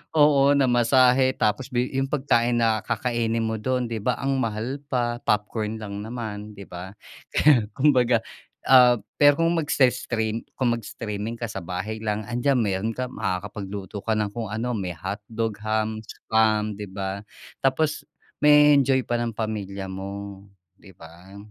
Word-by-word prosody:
Oo, 145 -2 +5
namasahe 130 0 +4
tapos 110 +5 0
big 125 +1 -1
yung 135 0 0
pagkain 120 -4 +1
na 110 -2 +2
kakainin 115 -2 -1
mo 110 0 -1
do'n, 125 +2 -1
'di 115 -1 -3
ba, 125 -3 0
ang 135 0 0
mahal 115 +4 -3
pa 120 -1 0
popcorn 105 +1 -1
lang 100 -1 -6
naman, 105 -3 -6
'di 100 - -9
ba? 90 +2 -8 0.4
Kaya, 135 -8 +4
kumbaga, 125 -5 +3 0.5
ah 125 -3 +7 0.2
pero 145 +1 +6
kung 170 +1 +2
magse-stream 125 -7 0 0.2
kung 120 -2 +2
mag-streaming 110 0 -5
ka 115 - -3
sa 95 -4 -6
bahay 95 +6 -4
lang 105 0 -1
andiyan 125 +2 +1
meron 105 +1 0
ka 125 0 -3
makakapagluto 100 -1 -5
ka 115 - -1
ng 105 -1 0
kung 115 -3 -4
ano, 120 +3 -2
may 95 -4 -3
hotdog, 105 +5 -4
ham, 110 0 -1
spam, 110 -1 0
'di 105 -1 -7
ba? 100 +1 -4 0.4
Tapos 150 +3 +1 0.4
ma-e-enjoy 145 -3 +6
pa 120 - 0
ng 120 -1 -1
pamilya 100 -3 -4
mo, 100 +1 -7 0.3
'di 95 - -16
ba? 85 +5 -14
115 Hz, 150 wpm, -24 LUFS, 105-125 Hz, 0.5 s, ah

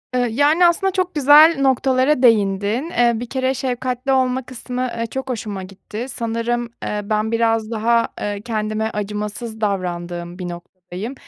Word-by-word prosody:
Iıı, 245 -1 +2
yani, 290 +9 +3
aslında 385 +3 +3
çok 370 -1 -1
güzel 300 +3 +7
noktalara 265 +1 +2
değindin. 210 - +2
Eee, 240 -1 +5
bir 235 +2 -4
kere 260 0 0
şefkatli 255 0 -2
olma 260 0 +1
kısmı, 250 0 -6
ııı, 230 - -2
çok 265 +2 -5
hoşuma 210 -5 -4
gitti. 200 +4 -8
Sanırım, 235 0 -2
eee, 210 - -2
ben 215 +1 -1
biraz 225 -1 +1
daha, 230 +1 +2
eee, 205 -1 -3
kendime 215 -1 -2
acımasız 210 +2 -5
davrandığım 175 -3 -3
bir 180 -1 -4
noktadayım. 180 +5 -8
230 Hz, 150 wpm, -20 LUFS, 210-260 Hz, -, güzel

